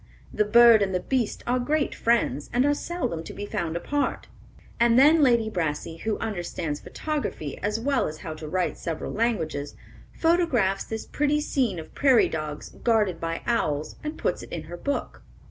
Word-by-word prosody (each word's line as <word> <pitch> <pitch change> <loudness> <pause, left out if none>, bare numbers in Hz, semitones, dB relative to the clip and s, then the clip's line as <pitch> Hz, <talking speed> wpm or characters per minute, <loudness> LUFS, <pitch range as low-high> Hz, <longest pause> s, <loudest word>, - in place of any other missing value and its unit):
The 210 - +2
bird 235 0 +7
and 190 -2 0
the - - +2
beast 250 +1 -1
are 250 +1 +1
great 295 +4 0
friends, 225 - +1
and 250 +2 +2
are 290 - +4
seldom 290 - -3
to - - -9
be 205 - -5
found 170 -4 -3
apart." 290 +11 -2 0.5
And 235 0 +4
then 305 +4 +6
Lady 235 -5 +4
Brassey, 165 -5 -3
who 220 +2 -1
understands 175 -7 -3
photography 295 - -4
as 210 +2 -1
well 270 +2 +1
as 155 - -6
how 160 - -4
to 155 0 -8
write 180 +3 -1
several 165 -3 -4
languages, 160 -11 -1 0.4
photographs 305 - +2
this 220 0 -5
pretty 295 0 +1
scene 255 -9 0
of 160 - -9
prairie 265 -4 +4
dogs 155 -2 -5
guarded 210 -7 +1
by 165 0 -3
owls, 155 -11 -1
and 305 +1 -4
puts - - -1
it - - -11
in 165 - -4
her 165 +3 -8
book. 280 +11 -3
220 Hz, 180 wpm, -26 LUFS, 165-260 Hz, 0.5 s, bird